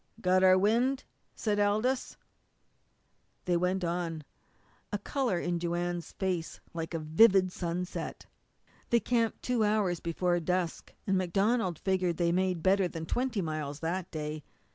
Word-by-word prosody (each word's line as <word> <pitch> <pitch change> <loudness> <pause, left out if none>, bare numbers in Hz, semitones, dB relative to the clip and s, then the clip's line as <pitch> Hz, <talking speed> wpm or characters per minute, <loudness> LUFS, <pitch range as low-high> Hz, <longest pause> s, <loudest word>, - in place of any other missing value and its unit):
"Got 185 -2 +3
our 185 0 +7
wind," 240 +7 +2 0.3
said 210 -2 0
Aldous. 215 +6 +1 1.3
They 180 - +2
went 180 +2 +1
on, 170 -2 -2 0.7
a 205 - 0
colour 240 -1 -1
in 175 0 -1
Joanne's 175 0 -2
face 180 -4 -2
like 165 -1 -4
the 165 - -3
vivid 185 +4 +5
sunset. 180 +1 -4 0.6
They 235 - +4
camped 230 -1 0
two 245 -3 +1
hours 210 -5 +1
before 175 +1 0
dusk, 180 0 -2
and 190 -1 +2
MacDonald 190 0 +1
figured 185 -3 0
they 175 - +1
had - - +1
made 185 -3 0
better 190 0 +4
than 165 -2 -6
twenty 240 +1 -1
miles 155 -2 -4
that 175 +2 -2
day. 155 -1 -4
180 Hz, 140 wpm, -30 LUFS, 170-205 Hz, 1.3 s, our